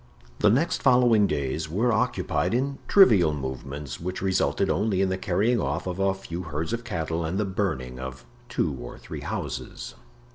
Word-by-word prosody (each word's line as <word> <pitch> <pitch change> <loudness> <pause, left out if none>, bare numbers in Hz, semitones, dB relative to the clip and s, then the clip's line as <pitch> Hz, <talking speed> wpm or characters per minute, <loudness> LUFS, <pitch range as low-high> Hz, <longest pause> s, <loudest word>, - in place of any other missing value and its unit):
The 105 - +5
next 140 +11 +2
following 125 -5 +5
days 70 +3 -2
were 110 +8 +1
occupied 95 -7 0
in 135 +2 -1
trivial 100 - +6
movements 70 0 -6
which 90 +2 -4
resulted 95 -1 +1
only 100 0 +1
in 95 -1 +2
the 95 - 0
carrying 105 +6 +1
off 75 +5 -2
of 90 0 -4
a 95 0 +2
few 90 -2 -6
herds 80 +3 -3
of 115 0 -2
cattle 85 -6 -2
and 80 +4 -2
the 105 - +1
burning 80 -11 -2
of 65 0 -7 0.2
two 85 - 0
or - - -8
three - - -8
houses. - - -5
95 Hz, 175 wpm, -26 LUFS, 75-110 Hz, 0.2 s, trivial